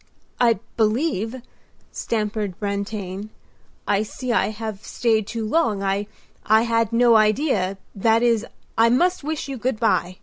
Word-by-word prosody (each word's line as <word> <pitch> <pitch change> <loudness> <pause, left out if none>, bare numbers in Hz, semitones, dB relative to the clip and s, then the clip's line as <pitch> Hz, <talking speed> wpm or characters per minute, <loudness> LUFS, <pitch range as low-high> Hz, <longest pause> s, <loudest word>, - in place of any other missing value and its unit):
"I 235 -3 +4 0.2
believe," 230 - 0 0.5
stammered 210 -4 -3
Brantain, 200 -1 -4 0.6
"I 205 0 +2
see 250 +4 -6
that 235 - +3
I - - 0
have 215 -1 -6
stayed 220 -3 0
too 230 -2 -3
long. 220 -7 +1
I—I 205 +2 0
had 230 -1 +1
no 230 -1 +5
idea—that 215 -2 +1
is, 230 -3 +3 0.3
I 230 +1 +5
must 350 +8 +2
wish 310 0 -3
you 270 -1 -5
good 245 -1 -2
by." 185 -5 +1
220 Hz, 135 wpm, -22 LUFS, 205-235 Hz, 0.6 s, no